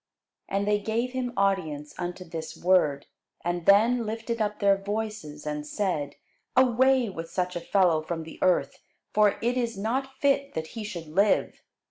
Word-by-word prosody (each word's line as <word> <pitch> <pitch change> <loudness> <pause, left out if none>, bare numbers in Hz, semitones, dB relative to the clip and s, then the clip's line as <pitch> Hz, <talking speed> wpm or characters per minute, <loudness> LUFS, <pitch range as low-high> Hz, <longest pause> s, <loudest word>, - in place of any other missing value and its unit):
And 200 +1 0
they 210 0 +3
gave 225 +4 -1
him 255 -1 -2
audience 165 -7 0
unto 175 +1 -4
this 165 -1 -7
word, 170 -6 +2 0.4
and 175 -1 -2
then 230 +5 +5
lifted 225 +1 -3
up 210 0 -1
their 200 -1 +4
voices, 200 -7 -5
and 150 0 -3
said, 150 -4 -2 0.4
Away 260 0 +4
with 165 -4 -6
such 180 0 -2
a - - -1
fellow 175 -3 +3
from 165 +1 -4
the 160 - -11
earth: 155 -7 +2 0.3
for 210 -1 +4
it 245 +2 +1
is 235 -4 -1
not 265 +6 -2
fit 280 0 +1
that 160 0 -3
he 225 -2 -5
should 175 -6 -6
live. 195 +7 +1
200 Hz, 165 wpm, -27 LUFS, 165-230 Hz, 0.4 s, then